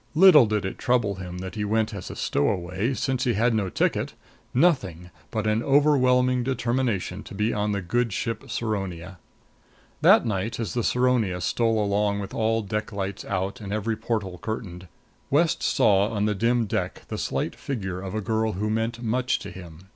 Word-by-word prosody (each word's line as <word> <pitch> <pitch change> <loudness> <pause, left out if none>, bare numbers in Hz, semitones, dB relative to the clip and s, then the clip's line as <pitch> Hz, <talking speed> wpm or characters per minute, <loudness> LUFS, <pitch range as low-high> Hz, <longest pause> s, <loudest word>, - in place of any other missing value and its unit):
Little 155 - +8
did 105 -2 -1
it 95 - -5
trouble 120 -6 +1
him 90 -1 -7
that 95 +1 -6
he 105 - -3
went 110 +1 0
as 100 -3 -6
a - - -7
stowaway, 90 - 0
since 130 0 -1
he 120 - +1
had 115 +3 +2
no 105 -4 0
ticket; - - -1 0.4
nothing 100 - +1 0.2
but 110 -1 -2
an 110 +1 +1
overwhelming 130 -3 +3
determination 120 -6 -1
to - - -10
be 105 +3 0
on 105 0 0
the 100 -2 -2
good 120 +6 0
ship 115 +4 -3
Saronia. 95 -5 -4 0.8
That - - +6
night 110 +2 -2
as 110 -7 -3
the 120 - -1
Saronia 125 -8 +1
stole 115 +4 +1
along 100 0 +1
with 100 - -6
all 115 0 +1
deck 105 +3 -3
lights 100 -1 -4
out 95 +4 -3
and 100 -1 -6
every 110 +2 -1
porthole 105 -5 -3
curtained, 95 -4 -5 0.4
West 160 +4 +2
saw 105 -5 +3
on 105 -2 -1
the 105 - +1
dim 115 +3 +1
deck 100 - -3
the - - -4
slight - - -2
figure 95 -9 -4
of 95 +1 -6
a 110 - -1
girl 110 +1 0
who 105 +3 -2
meant 115 +2 -2
much 125 +2 +1
to - - -8
him. 85 -3 -11
110 Hz, 185 wpm, -25 LUFS, 95-120 Hz, 0.8 s, Little